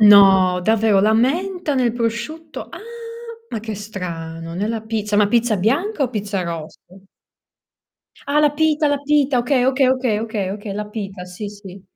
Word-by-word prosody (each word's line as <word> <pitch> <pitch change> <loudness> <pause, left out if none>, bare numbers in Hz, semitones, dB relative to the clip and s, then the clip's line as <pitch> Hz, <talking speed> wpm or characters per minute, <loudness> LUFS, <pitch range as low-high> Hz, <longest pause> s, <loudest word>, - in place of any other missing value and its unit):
No, 195 -3 +7
davvero? 220 0 +3
La 215 +2 +3
menta 315 - +1
nel 245 -3 +2
prosciutto? 245 +7 -4
Ah, 340 - -9 0.7
ma 220 - -3
che 220 -1 -5
strano, 165 -5 -6
nella 215 +5 -2
pizza. 215 -1 -2
Ma 205 -1 +4
pizza 230 -1 +2
bianca 285 - 0
o 255 - +2
pizza 200 -4 -2
rossa? 165 -2 -6 1.5
Ah, 290 +2 +2
la 295 -1 +3
pita, 305 -1 +2
la 285 - +1
pita. 285 -3 +3
Okay, 250 +1 +2
okay, 265 0 +3
okay, 255 -5 +1
okay, 215 -4 -3
okay. 205 0 -5
La 210 0 -5
pita, 195 -4 -6
sì, 180 +3 -7
sì. 200 -2 -11
220 Hz, 160 wpm, -20 LUFS, 200-265 Hz, 1.5 s, No